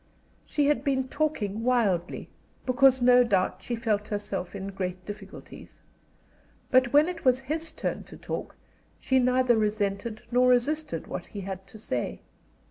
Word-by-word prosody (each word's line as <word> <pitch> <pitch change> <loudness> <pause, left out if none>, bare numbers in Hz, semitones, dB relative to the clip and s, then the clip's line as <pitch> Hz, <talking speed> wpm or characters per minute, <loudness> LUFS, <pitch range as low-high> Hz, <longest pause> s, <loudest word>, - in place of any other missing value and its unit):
She 290 - +1
had 280 -3 +2
been 265 -2 0
talking 235 -10 -1
wildly, 210 -9 +1 0.4
because 260 0 +4
no 250 0 +7
doubt 195 -6 0
she 240 - -3
felt 215 -3 -1
herself 205 -3 -4
in 195 0 -5
great 185 -1 -5
difficulties. 205 -1 -10 0.9
But 255 -2 +4
when 295 +2 +6
it 355 -2 -5
was 255 0 +3
his 315 +4 -2
turn - - -4
to - - -12
talk - - -5 0.4
she 265 0 +2
neither 255 -1 +3
resented 215 0 -1
nor 250 +1 +4
resisted 295 +6 +1
what - - -6
he 205 - -7
had 190 0 -6
to 220 - -12
say. 120 - -3
240 Hz, 150 wpm, -27 LUFS, 200-260 Hz, 0.9 s, no